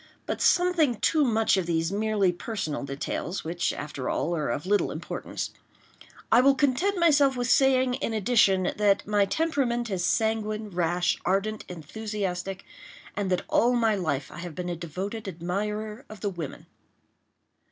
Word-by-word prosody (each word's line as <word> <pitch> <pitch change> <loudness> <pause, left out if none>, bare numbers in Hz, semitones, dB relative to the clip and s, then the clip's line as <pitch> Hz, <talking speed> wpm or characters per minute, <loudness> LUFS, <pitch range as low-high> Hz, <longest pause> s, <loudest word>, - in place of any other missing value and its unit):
But - - -3
something 350 -8 +3
too 305 +6 +3
much 225 -5 +3
of 185 -3 -1
these 165 0 0
merely 205 -2 +1
personal 175 -5 -4
details, 140 +6 -4
which, 170 +2 -1
after 140 -3 -5
all, 170 - 0
are 155 -6 -1
of 140 +7 -2
little 205 +2 +2
importance. - - -5 0.8
I 235 - +7
will 275 +1 +5
content 290 +9 +1
myself 290 -6 +4
with 245 0 0
saying, 260 -2 +4
in 260 -2 -2
addition, 205 -4 +3
that 205 -1 +3
my 205 -1 +3
temperament 240 -3 0
is 185 -2 -1
sanguine, 215 +1 0
rash, 175 0 +1
ardent, 200 +4 0
enthusiastic—and 195 +2 -5
that 180 -1 0
all 245 +2 +3
my 230 -3 +3
life 155 -9 -2
I - - -9
have 170 -3 -7
been 180 -1 -4
a 175 - -2
devoted 185 +6 -5
admirer 210 +6 -3
of 215 -3 -11
the 205 - 0
women. 165 -6 -7
205 Hz, 150 wpm, -27 LUFS, 180-235 Hz, 0.8 s, I